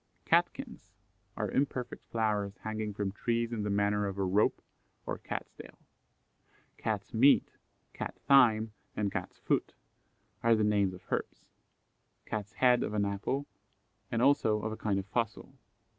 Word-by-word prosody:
Catkins - - 0 0.5
are - - -2
imperfect 130 -3 -2
flowers 105 -3 -1
hanging 110 -1 -3
from 100 -1 -2
trees 115 +3 -1
in 110 - -2
the 105 - -2
manner 100 0 +1
of 100 0 -5
a 100 - 0
rope 95 +3 +2 0.5
or - - -3
cat's - - -5
tail. - - -12 1.0
Cat's 105 -2 -3
meat, 130 +5 +5 0.4
Cat - - -5
thyme, 115 -5 +6 0.2
and 100 -2 0
Cat's - - -4
foot - - -1 0.7
are 115 0 +5
the 110 - +1
names 100 -3 +2
of 90 - -14
herbs; - - -3 0.8
Cat's 105 0 -4
head 125 0 +4
of 105 - -2
an 100 -1 +2
apple, 100 +8 -2 0.7
and 115 +1 +1
also 130 -6 +4
of 110 - -2
a - - -3
kind 105 -3 -1
of 95 - -2
fossil. 115 +1 -3
110 Hz, 150 wpm, -31 LUFS, 100-115 Hz, 1.0 s, thyme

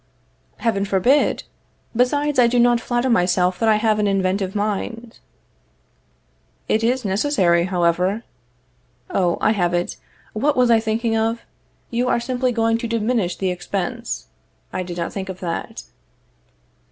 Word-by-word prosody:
Heaven 210 -4 0
forbid! 200 +9 +2 0.5
Besides, 285 +4 +1
I 240 - +6
do 245 +1 +1
not 240 0 +4
flatter 240 +2 -1
myself 180 -4 +2
that 225 - +2
I 215 - +5
have 215 0 +1
an 210 - +2
inventive 195 0 0
mind. 220 +3 -3 1.5
It 220 - +1
is 250 +1 +1
necessary, 190 -5 +2
however. 180 +4 +1 0.9
Oh, 175 -3 +1
I - - +3
have 175 -5 +1
it. 175 - -2 0.4
What 280 +6 0
was 250 -1 +4
I 230 - +6
thinking 225 +1 -1
of? 225 +1 0 0.5
You 245 +1 0
are 245 - +2
simply 250 +1 -1
going 225 -1 +1
to 235 - -3
diminish 225 -4 0
the 190 -1 -1
expense. 200 +6 -4 0.5
I 185 - -2
did 175 -1 -6
not 170 -1 -3
think 190 -1 -5
of 190 0 -6
that. 170 -2 -4
220 Hz, 145 wpm, -21 LUFS, 185-240 Hz, 1.5 s, I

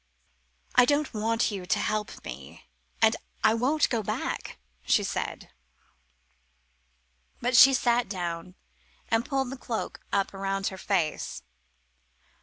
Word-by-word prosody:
"I 250 - +7
don't 290 +1 +1
want 225 +1 +1
you 190 -3 -6
to - - +2
help 215 0 -3
me; - - -9 0.4
and 220 0 +6 0.3
I 220 - +5
won't 270 +7 +2
go 230 -3 +1
back," 200 - -4 0.3
she - - +3
said. - - -4 1.9
But 245 +1 0
she 270 +3 +9
sat 240 -4 +2
down 175 -2 -4 0.5
and 225 +1 +2
pulled 270 -2 -1
the 270 - -6
cloak 235 -3 -4
up 200 0 0
round 195 0 -1
her 190 - -9
face. 175 - -1
220 Hz, 125 wpm, -27 LUFS, 195-245 Hz, 1.9 s, she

